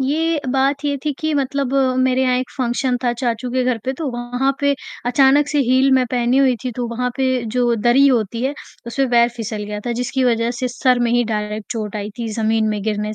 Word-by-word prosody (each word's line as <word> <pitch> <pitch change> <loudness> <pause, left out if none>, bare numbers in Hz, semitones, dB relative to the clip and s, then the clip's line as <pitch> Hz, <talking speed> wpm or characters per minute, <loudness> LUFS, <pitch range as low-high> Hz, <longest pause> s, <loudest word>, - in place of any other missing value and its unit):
ये 310 +3 0
बात 275 +2 +1
ये 285 -1 0
थी 300 - 0
कि 315 0 -1
मतलब 275 -1 -1 0.3
मेरे 260 0 +2
यहाँ 250 -1 +2
एक 255 - -4
फंक्शन 250 0 0
था 240 - +2
चाचू 240 0 -2
के 255 0 0
घर 250 -2 0
पे 260 - -1
तो 315 - -3
वहाँ 245 +3 -1
पे 285 0 +2 0.3
अचानक 270 +3 +4
से 295 - 0
हील 260 +1 +4
मैं 260 -1 +4
पहनी 245 0 +1
हुई 265 -2 +4
थी, 255 - -1
तो 245 +1 -3
वहाँ 250 +1 -2
पे 260 -2 +1
जो 240 +1 +1
दरी 240 +5 +4
होती 230 -2 +1
है 280 +2 -1 0.3
उसमें 265 +2 -1
पैर 235 0 +5
फिसल 215 -2 -4
गया 210 0 -5
था 240 - 0
जिसकी 250 +2 -1
वजह 230 -1 +1
से 255 - 0
सर 250 +1 +1
में 235 -1 +1
ही 240 0 +3
डायरेक्ट 210 0 -4
चोट 215 -2 -4
आई 210 0 -4
थी 230 - -3
ज़मीन 220 -1 +1
में 210 -1 -2
गिरने 210 0 -2
250 Hz, 230 wpm, -19 LUFS, 230-265 Hz, 0.3 s, पैर